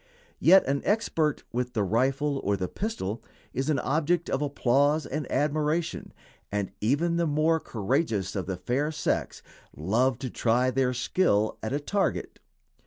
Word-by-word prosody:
Yet 190 +3 +6
an 140 +1 0
expert 165 -8 0
with 125 +1 -2
the 105 - +1
rifle 135 +7 +1
or 100 0 +1
the 90 -1 -2
pistol 120 - -4 0.3
is 135 +3 -2
an 150 - +2
object 155 +6 0
of 135 - 0
applause 145 +2 +2
and 150 +2 -4
admiration, 155 +2 0 0.4
and 100 -2 -2
even 160 +9 +1
the 170 -1 +1
more 155 +2 +2
courageous 110 - -1
of 95 -3 -3
the 95 -2 -3
fair 130 - -1
sex 150 -3 -2 0.3
love 115 - +1
to 130 -2 -5
try 125 +2 +2
their 130 0 +1
skill 110 - +1
at 110 - -3
a 140 - 0
target. 195 +7 -2
135 Hz, 155 wpm, -27 LUFS, 115-155 Hz, 0.4 s, Yet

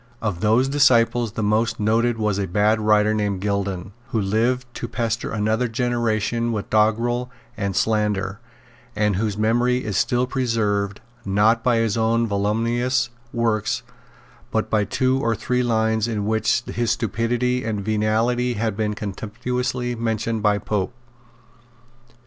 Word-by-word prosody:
Of 105 -6 -2
those 110 +7 +3
disciples 120 -5 +3
the 110 - -2
most 110 +2 +1
noted 115 +2 +2
was 105 -2 0
a 100 - -1
bad 105 +4 +2
writer 105 0 +3
named 105 -3 -1
Gildon, 100 -2 -2 0.2
who 125 -4 -1
lived 115 +6 +1
to 120 - -5
pester 115 -1 -2
another 110 +3 0
generation 120 -1 0
with 105 -3 -4
doggrel 115 +3 +2 0.3
and 100 -3 -2
slander, 105 -2 0 0.6
and 105 -2 +1
whose 105 -1 -1
memory 120 +3 +1
is 105 -2 -2
still 125 0 +2
preserved, 110 -6 -1 0.2
not 105 +4 +2
by 125 -2 +3
his 115 -1 +1
own 115 +1 +2
voluminous 115 +4 0 0.2
works, 115 -3 0 0.7
but - - -1
by 105 -2 +2
two 130 +6 +1
or 115 -2 +1
three 125 +3 -1
lines 110 -2 +1
in 105 -3 -2
which 110 +2 +1
his 120 -1 -2
stupidity 120 +3 0
and 105 -3 -3
venality 110 +3 +1
have 110 -1 -1
been 105 0 -1
contemptuously 120 +5 -3
mentioned 115 -1 -2
by 105 -1 +3
Pope. 105 +2 -2
110 Hz, 140 wpm, -22 LUFS, 105-120 Hz, 0.7 s, those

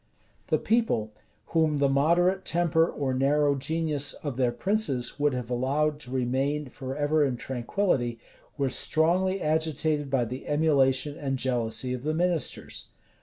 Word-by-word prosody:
The - - +2
people, 220 - 0 0.4
whom 160 -2 +2
the 140 0 +3
moderate 170 +7 +2
temper 165 -1 +2
or 135 -2 -2
narrow 140 +2 +2
genius 145 +1 -1
of 145 -4 -6
their 125 -1 +1
princes 140 - -1
would 145 -2 +2
have 125 -1 -5
allowed 145 +5 0
to 125 -4 -11
remain 135 +3 -1
forever 145 +4 0
in 130 -4 0
tranquillity, 120 -1 -1 0.4
were 140 -2 +1
strongly 180 +8 +1
agitated 155 -1 0
by 130 -3 +1
the 125 +3 -7
emulation 145 -2 +2
and 135 -2 -2
jealousy 125 -1 -1
of 125 - -4
the 155 +3 -1
ministers. 175 -1 -1
145 Hz, 140 wpm, -27 LUFS, 130-160 Hz, 0.4 s, the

